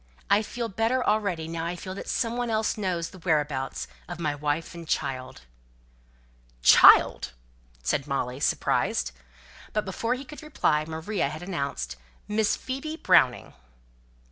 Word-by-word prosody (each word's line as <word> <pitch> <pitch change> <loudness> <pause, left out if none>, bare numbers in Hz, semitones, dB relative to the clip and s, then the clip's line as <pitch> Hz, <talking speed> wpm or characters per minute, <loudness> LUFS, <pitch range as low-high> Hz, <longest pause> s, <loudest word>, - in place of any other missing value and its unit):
I 205 - +6
feel 235 +2 -4
better 225 +4 0
already, 200 -7 0
now 165 0 -4
I 170 +1 -2
feel 185 +2 -7
that 195 - -7
some 230 0 0
one 245 -1 -1
else 220 -1 0
knows 180 -5 -2
the 185 - -12
whereabouts 145 - -1 0.2
of - - -6
my 150 -3 0
wife 145 +2 -2
and 170 -1 -9
child." 130 -4 -3 1.2
"Child!" 60 - +7 0.5
said 135 - 0
Molly, 130 -2 -2
surprised. - - +1 0.6
But 215 - 0
before 230 +6 -1
he 270 +2 -8
could 300 +4 -10
reply, 160 - +1
Maria 160 +1 -2
had 155 +3 -7
announced, 140 - -3 0.3
"Miss 210 0 +1
Phoebe 270 +4 -5
Browning." 145 - +3
175 Hz, 145 wpm, -27 LUFS, 150-220 Hz, 1.2 s, Child